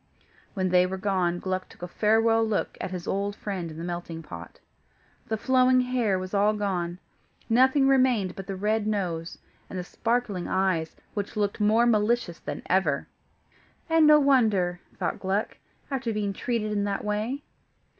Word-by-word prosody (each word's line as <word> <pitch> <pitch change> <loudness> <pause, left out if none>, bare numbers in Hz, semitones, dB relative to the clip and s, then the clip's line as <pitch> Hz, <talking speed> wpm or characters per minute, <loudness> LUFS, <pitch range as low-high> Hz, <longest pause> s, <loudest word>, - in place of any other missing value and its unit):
When 185 -2 0
they 180 0 +4
were 190 +1 -4
gone, 185 -3 0
Gluck 185 +1 -3
took - - -14
a - - -3
farewell 225 +4 +3
look 220 -3 -1
at - - -3
his 180 -2 -6
old 200 +1 -1
friend 190 -6 -4
in 155 - -9
the 165 - -6
melting 175 -1 -5
pot. 85 - -10 0.7
The 220 - -1
flowing 255 +1 +4
hair 245 -6 +1
was 185 +1 -6
all 205 +1 +3
gone; 180 -4 -2 0.5
nothing 260 +4 +4
remained 255 -8 +3
but 195 - -8
the 195 - -3
red 210 +2 0
nose, 175 -6 -2 0.3
and 190 - -6
the 180 - -3
sparkling 225 -2 -1
eyes, 180 -4 0 0.2
which 205 -1 -4
looked 205 0 0
more 215 +3 +4
malicious 220 -5 +1
than - - -6
ever. 170 -7 +1 0.9
"And 325 -1 +6
no 300 0 +8
wonder," 215 -11 +3 0.2
thought - - -2
Gluck, 195 +2 -1 0.3
"after 260 -4 -1
being 210 -2 -1
treated 215 0 -2
in 205 -1 0
that 200 0 -2
way." 215 +7 -2
205 Hz, 165 wpm, -26 LUFS, 185-230 Hz, 0.9 s, no